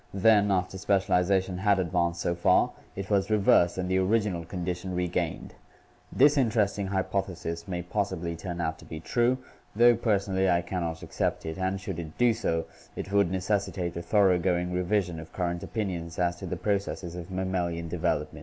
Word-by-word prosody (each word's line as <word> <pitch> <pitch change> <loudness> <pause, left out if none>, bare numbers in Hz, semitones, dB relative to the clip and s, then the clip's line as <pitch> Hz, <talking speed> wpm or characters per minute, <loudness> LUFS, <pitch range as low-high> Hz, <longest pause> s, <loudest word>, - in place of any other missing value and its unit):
Then, 105 +1 +5
after 95 0 0
specialization 95 -1 +1
had 100 0 +3
advanced 85 -1 0
so 85 - 0
far, 85 - +3 0.2
it 100 +1 -5
was 100 0 +2
reversed 100 -5 +4
and 90 -1 -2
the 95 +1 +2
original 95 -3 +1
condition 90 +1 -4
regained. 90 -1 -2 0.6
This 145 +2 +5
interesting 105 -5 +1
hypothesis 95 -3 -2
may 90 -2 -3
possibly 90 -3 -2
turn 85 +1 -6
out 80 -2 -2
to - - -14
be 80 - -7
true, 120 +9 +1 0.4
though 120 +2 +6
personally 100 -4 +1
I 85 -1 +2
can 90 +1 -3
not 80 -1 -4
accept - - -2
it, 80 +3 -5
and, 95 +1 -1
should 95 -3 -5
it 80 -2 -8
do 120 -1 +4
so, 80 -6 -1 0.3
it 95 - -6
would 100 -3 +3
necessitate 95 -1 -1
a 85 - -3
thor 100 +1 +4
oughgoing 90 0 0
revision 90 -2 0
of 80 0 -11
current 85 -1 -2
opinions 90 -7 -4
as 85 -1 +1
to - - -7
the 90 - -3
processes 95 -2 -2
of 90 0 -7
mam 95 0 -2
malian 85 -2 -2
development." 80 -3 -2
95 Hz, 180 wpm, -28 LUFS, 85-100 Hz, 0.6 s, though